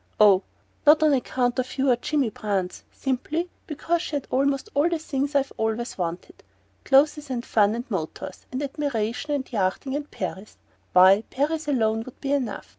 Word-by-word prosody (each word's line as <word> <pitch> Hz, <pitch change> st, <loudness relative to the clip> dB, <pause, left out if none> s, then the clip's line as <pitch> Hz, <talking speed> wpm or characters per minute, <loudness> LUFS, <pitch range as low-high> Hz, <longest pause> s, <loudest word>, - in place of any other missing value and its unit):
Oh, 200 Hz, -3 st, +7 dB, 0.5 s
not 310 Hz, +1 st, +7 dB
on 305 Hz, -2 st, +5 dB
account 250 Hz, -1 st, 0 dB
of 255 Hz, +2 st, -3 dB
you 270 Hz, 0 st, +3 dB
or -, -, +5 dB
Jimmy 265 Hz, -1 st, 0 dB
Brance! 195 Hz, -4 st, -3 dB
Simply 310 Hz, +7 st, -2 dB, 0.2 s
because 330 Hz, +2 st, -1 dB
she 305 Hz, -, -4 dB
had 285 Hz, -, -2 dB
almost 275 Hz, +5 st, +1 dB
all 295 Hz, +4 st, +3 dB
the 340 Hz, -, 0 dB
things 285 Hz, -2 st, -3 dB
I've 275 Hz, -1 st, +1 dB
always 220 Hz, +2 st, -2 dB
wanted: 175 Hz, -1 st, -5 dB, 0.4 s
clothes 290 Hz, +1 st, +3 dB
and 245 Hz, -1 st, -3 dB
fun 210 Hz, 0 st, +3 dB
and 240 Hz, +1 st, -4 dB
motors, 165 Hz, -6 st, -5 dB
and 260 Hz, +3 st, -3 dB
admiration 275 Hz, -1 st, -2 dB
and 265 Hz, -2 st, -5 dB
yachting 205 Hz, +7 st, -1 dB
and 295 Hz, 0 st, -4 dB
Paris 195 Hz, +3 st, -6 dB, 0.4 s
why, 190 Hz, +3 st, +7 dB
Paris 300 Hz, +3 st, -1 dB
alone 225 Hz, -5 st, +1 dB
would 255 Hz, -, -12 dB
be 275 Hz, -, -3 dB
enough! 250 Hz, -7 st, -2 dB
260 Hz, 175 wpm, -25 LUFS, 220-290 Hz, 0.5 s, Oh